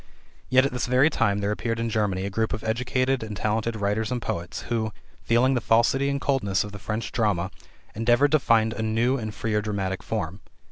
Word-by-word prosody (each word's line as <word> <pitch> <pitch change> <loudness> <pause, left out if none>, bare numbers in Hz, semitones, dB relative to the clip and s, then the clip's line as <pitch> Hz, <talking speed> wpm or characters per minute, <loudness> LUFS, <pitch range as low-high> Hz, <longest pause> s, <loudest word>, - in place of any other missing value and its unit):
Yet 130 +1 +5
at 140 - -1
this 125 0 -2
very 130 +5 +4
time 105 -7 +1
there 100 +1 0
appeared 115 +2 -2
in 115 - -1
Germany 100 -4 0
a 100 - -4
group 110 +2 -1
of 110 - -4
educated 130 +3 0
and 110 -2 -6
talented 110 +2 -1
writers 105 +2 -1
and 125 - -1
poets, 85 -6 -4
who, 110 -2 -1 0.3
feeling 120 +3 +3
the 125 - 0
falsity 120 +5 +3
and 140 0 -1
coldness 120 -10 +1
of 105 - -8
the 105 - -9
French 110 +3 -4
drama, 100 -6 0 0.4
endeavored 120 +6 +3
to 155 - +5
find 110 -3 +3
a 110 - -4
new 115 +4 +1
and 110 -3 -5
freer 105 -2 0
dramatic 100 -3 -2
form. 95 -4 -3
110 Hz, 205 wpm, -25 LUFS, 105-125 Hz, 0.4 s, Yet